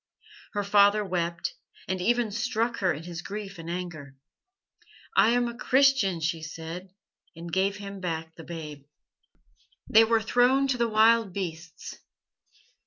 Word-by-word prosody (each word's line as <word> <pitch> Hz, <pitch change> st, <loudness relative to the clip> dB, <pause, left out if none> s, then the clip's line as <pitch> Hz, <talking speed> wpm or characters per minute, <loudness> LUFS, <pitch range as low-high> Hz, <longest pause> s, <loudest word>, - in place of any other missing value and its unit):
Her 205 Hz, -1 st, -1 dB
father 205 Hz, +1 st, +4 dB
wept, 175 Hz, -, -2 dB, 0.3 s
and 185 Hz, -1 st, -2 dB
even 235 Hz, +2 st, +1 dB
struck 235 Hz, +1 st, -1 dB
her 185 Hz, -2 st, +1 dB
in 155 Hz, -, -5 dB
his 170 Hz, -1 st, -7 dB
grief 200 Hz, -2 st, -7 dB
and 165 Hz, 0 st, -7 dB
anger. 170 Hz, -6 st, -6 dB, 1.0 s
'I -, -, +6 dB
am 240 Hz, 0 st, +2 dB
a 235 Hz, -, -6 dB
Christian,' 255 Hz, -9 st, +3 dB
she 160 Hz, +1 st, -1 dB
said, 165 Hz, +3 st, -7 dB, 0.5 s
and 165 Hz, 0 st, -9 dB
gave 195 Hz, +2 st, +1 dB
him 200 Hz, -1 st, -8 dB
back 160 Hz, -3 st, -4 dB
the 165 Hz, -, -11 dB
babe. 155 Hz, -4 st, -8 dB, 1.1 s
"They 225 Hz, +1 st, +7 dB
were 225 Hz, 0 st, +3 dB
thrown 245 Hz, +4 st, +3 dB
to 255 Hz, -, +1 dB
the 235 Hz, -1 st, +2 dB
wild 220 Hz, -2 st, +4 dB
beasts. 170 Hz, -4 st, -6 dB
195 Hz, 145 wpm, -27 LUFS, 170-230 Hz, 1.1 s, They